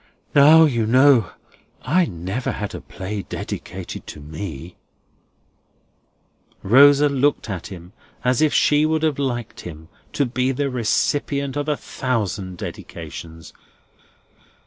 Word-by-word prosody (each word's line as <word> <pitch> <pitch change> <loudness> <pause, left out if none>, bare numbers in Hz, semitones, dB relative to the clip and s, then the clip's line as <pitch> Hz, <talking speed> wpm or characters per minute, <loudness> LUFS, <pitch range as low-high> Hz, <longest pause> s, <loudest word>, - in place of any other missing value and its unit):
Now, 155 +3 +7
you 115 -7 0
know, 130 -4 +5 0.5
I 180 +1 +2
never 95 +9 -4
had 105 -1 -5
a - - -7
play 100 +2 -6
dedicated - - -7
to - - -9
me!" 80 +2 -8 1.9
Rosa 140 +6 +6
looked 140 -4 0
at 95 -3 -5
him 90 -2 -11 0.3
as 125 +1 +1
if 155 -1 +3
she 150 0 +3
would 160 0 0
have 155 -3 0
liked 120 -5 -3
him 80 -1 -10 0.2
to 140 - +1
be 130 +1 -1
the 140 +1 -2
recipient 140 +4 -1
of 145 +1 -2
a 150 - 0
thousand 100 -7 -3
dedications. 80 -1 -9
125 Hz, 125 wpm, -21 LUFS, 95-145 Hz, 1.9 s, Now